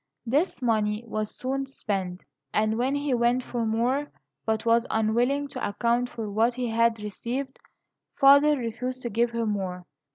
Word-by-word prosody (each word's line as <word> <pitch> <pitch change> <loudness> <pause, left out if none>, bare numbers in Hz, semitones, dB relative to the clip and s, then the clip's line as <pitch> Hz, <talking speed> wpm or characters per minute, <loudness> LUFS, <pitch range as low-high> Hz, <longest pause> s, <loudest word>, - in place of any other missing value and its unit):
This 280 +4 0
money 215 -2 +1
was 215 -1 -4
soon 270 +1 -2
spent, 195 -8 -4 0.3
and 215 +1 +1
when 255 +4 0
he 285 -1 0
went 240 +1 +2
for 235 -2 -2
more, 250 +6 0 0.4
but 220 0 0
was 230 0 +3
unwilling 240 +6 +1
to 255 - -6
account 235 +4 0
for 225 -3 -5
what 225 +4 +1
he 250 -2 -2
had 230 0 +2
received, 245 +6 -4 0.6
father 285 +2 +6
refused 250 +2 -4
to 240 - -3
give 235 +3 +2
him 230 -1 -1
more. 185 -3 -4
235 Hz, 160 wpm, -26 LUFS, 220-255 Hz, 0.6 s, father